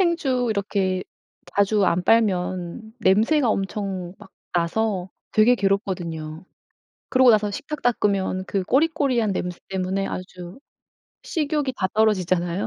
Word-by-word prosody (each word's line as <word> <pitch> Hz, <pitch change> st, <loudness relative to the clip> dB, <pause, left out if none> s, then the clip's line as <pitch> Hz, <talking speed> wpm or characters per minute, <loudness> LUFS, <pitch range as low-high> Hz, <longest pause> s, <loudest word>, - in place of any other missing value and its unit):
행주 295 Hz, -9 st, +1 dB
이렇게 195 Hz, -3 st, -1 dB, 0.5 s
자주 200 Hz, 0 st, +3 dB
안 180 Hz, 0 st, +1 dB
빨면 185 Hz, 0 st, 0 dB
냄새가 230 Hz, +8 st, +3 dB
엄청 195 Hz, -3 st, -3 dB
막 190 Hz, -, -15 dB, 0.2 s
나서 180 Hz, +2 st, 0 dB, 0.2 s
되게 220 Hz, +3 st, +5 dB
괴롭거든요. 180 Hz, -6 st, -2 dB, 0.6 s
그러고 255 Hz, -1 st, +5 dB
나서 210 Hz, -2 st, +3 dB
식탁 290 Hz, +8 st, -6 dB
닦으면 200 Hz, -5 st, 0 dB
그 195 Hz, -2 st, -1 dB
꼬리꼬리한 265 Hz, -, +2 dB
냄새 180 Hz, -1 st, -3 dB
때문에 190 Hz, +1 st, -2 dB
아주 180 Hz, +2 st, -7 dB, 0.6 s
식욕이 295 Hz, -3 st, -1 dB
다 190 Hz, -, 0 dB
떨어지잖아요. 185 Hz, -4 st, +1 dB
200 Hz, 275 characters per minute, -23 LUFS, 185-230 Hz, 0.6 s, 되게